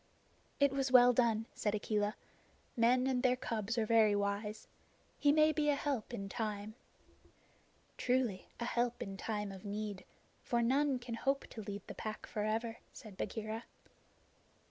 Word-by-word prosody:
"It 280 -1 +5
was 270 -1 0
well 250 -1 +8
done," 225 -2 +2
said 210 -1 -1
Akela. 210 0 0 0.6
"Men 250 +2 +4
and 260 -2 +1
their 250 0 +4
cubs 230 -2 -3
are 225 - +2
very 215 -2 +5
wise. 205 +1 -2 0.5
He 290 - +5
may 310 +1 +5
be 305 -1 +1
a 290 - +4
help 275 -6 -2
in 200 -5 -4
time." 210 0 -3 1.2
"Truly, 245 -6 0
a 235 - -2
help 240 0 0
in 195 -3 -6
time 210 0 -3
of 190 -1 -10
need; 205 -2 -4 0.4
for 235 -1 0
none 270 +3 +2
can 240 -1 -7
hope 275 +4 0
to 220 - -6
lead 205 0 -6
the - - -7
Pack 215 0 -5
forever," 220 +2 -2
said 215 -4 -11
Bagheera. 220 +3 -4
225 Hz, 155 wpm, -35 LUFS, 210-250 Hz, 1.2 s, well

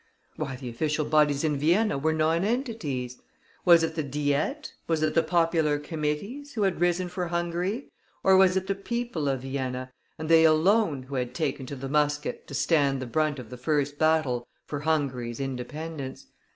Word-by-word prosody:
Why, 140 -4 -4
the 125 0 -8
official 150 +6 -1
bodies 150 -2 +3
in 150 -2 +1
Vienna 175 +5 +3
were 150 +3 +1
nonentities! 160 - -1 0.4
Was 170 -2 +7
it 160 - -1
the 160 - -1
Diet, 145 - -1
was 160 -2 +1
it 155 - +1
the 165 - +4
popular 165 -4 +2
committees, 160 - -4
who 215 - +1
had 190 -3 0
risen 175 +1 +2
for 180 0 -3
Hungary, 175 +7 -2 0.3
or 190 - +6
was 190 -1 +5
it 190 - -1
the 195 - 0
people 200 -5 -3
of 135 -2 -1
Vienna, 130 -1 -3 0.3
and 155 - -5
they 165 0 +6
alone, 160 -1 +3
who 135 +2 -11
had 125 -2 -2
taken 145 -5 -2
to 140 - -5
the 135 0 -6
musket 150 +1 0
to 140 - -7
stand 140 -3 +2
the 130 - -4
brunt 155 +3 0
of 125 -3 -9
the 125 - -7
first 145 +2 -1
battle 155 -7 +2 0.2
for 145 - -4
Hungary's 135 -6 -1
independence? 135 +2 -5
155 Hz, 180 wpm, -27 LUFS, 140-175 Hz, 0.4 s, Was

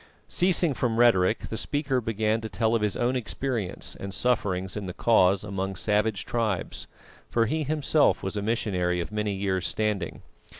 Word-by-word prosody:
Ceasing 175 -3 +2
from 120 -3 -1
rhetoric, 110 -4 +4
the 110 - -4
speaker 145 -2 -1
began 110 0 0
to 110 - -5
tell 110 +3 0
of 115 - +2
his 105 -2 0
own 120 +2 +1
experience 120 -4 -2
and 100 0 -6
sufferings 95 -6 0
in 105 -2 -4
the 90 - -6
Cause 100 -4 +3
amongst 95 -1 -3
savage 105 -1 +1
tribes; 110 -6 -2 0.4
for 115 -1 +2
he 155 +8 -1
himself 150 0 +2
was 95 +2 -3
a 105 - -1
missionary 95 -5 0
of 85 - -4
many 105 -1 -1
years 95 -2 -1
standing. 105 -5 -2
110 Hz, 170 wpm, -26 LUFS, 95-120 Hz, 0.4 s, rhetoric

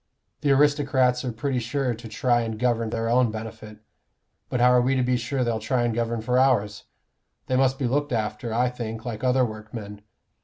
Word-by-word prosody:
The 145 - 0
aristocrats 135 -3 +3
are 125 - -2
pretty 125 +3 -2
sure 125 +2 -1
to 115 0 -9
try 120 +2 +1
and 110 -1 -4
govern 115 -1 0
for - - -3
their 115 0 -1
own 120 +1 +3
benefit; 110 -1 -8 0.7
but 125 - -1
how 125 +1 +5
are 125 0 +5
we 130 +2 +1
to 130 - +1
be 125 0 +1
sure 125 +2 -1
they'll 115 -2 -1
try 120 +3 0
and 120 -1 0
govern 115 0 -1
for 125 +3 +1
ours? 105 -6 +1 0.6
They 130 - -1
must 130 0 +2
be 135 - -2
looked 145 +4 0
after, 110 0 -2
I 125 +2 +1
think, 115 -1 -6
like 115 -1 -5
other 130 0 +3
workmen. 110 -2 -8
120 Hz, 205 wpm, -25 LUFS, 110-130 Hz, 0.7 s, how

